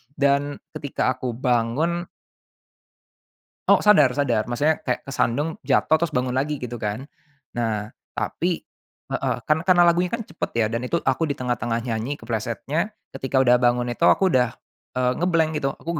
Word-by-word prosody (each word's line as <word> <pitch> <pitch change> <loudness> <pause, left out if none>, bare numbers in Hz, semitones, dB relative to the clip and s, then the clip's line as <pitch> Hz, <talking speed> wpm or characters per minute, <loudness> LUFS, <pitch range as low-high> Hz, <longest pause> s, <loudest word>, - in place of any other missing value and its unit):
Dan 140 0 +1 0.2
ketika 135 -2 -1
aku 125 - -3
bangun 130 +8 0 1.6
Oh, - - +8
sadar, 155 -11 +6
sadar. 120 -5 +1
Maksudnya 150 +6 +1
kayak 125 - -2
kesandung, 135 +3 0
jatuh, 155 - +3
terus 170 - +1
bangun 125 0 0
lagi 145 +3 0
gitu 120 -2 -6
kan. 105 +5 -3 0.5
Nah, 110 -2 -2 0.2
tapi 175 0 -2 0.5
heeh, - - 0
kan 155 - +3
karena 175 0 +5
lagunya 175 +1 +3
kan 230 -1 -3
cepat - - -4
ya, 115 - +3
dan 115 - -2
itu 170 - +1
aku 145 +4 +1
di 140 - -2
tengah-tengah 120 -2 -1
nyanyi 115 +5 -2
keplesetnya. 115 - -2 0.2
Ketika 135 0 -2
udah 125 -1 +5
bangun 120 0 +3
itu - - -21
aku 190 -1 +4
udah, 125 -2 +4 0.5
eee, 125 0 +2
nge-blank 165 -3 +2
gitu. 135 - +1
Aku - - -9
130 Hz, 160 wpm, -23 LUFS, 120-160 Hz, 1.6 s, Oh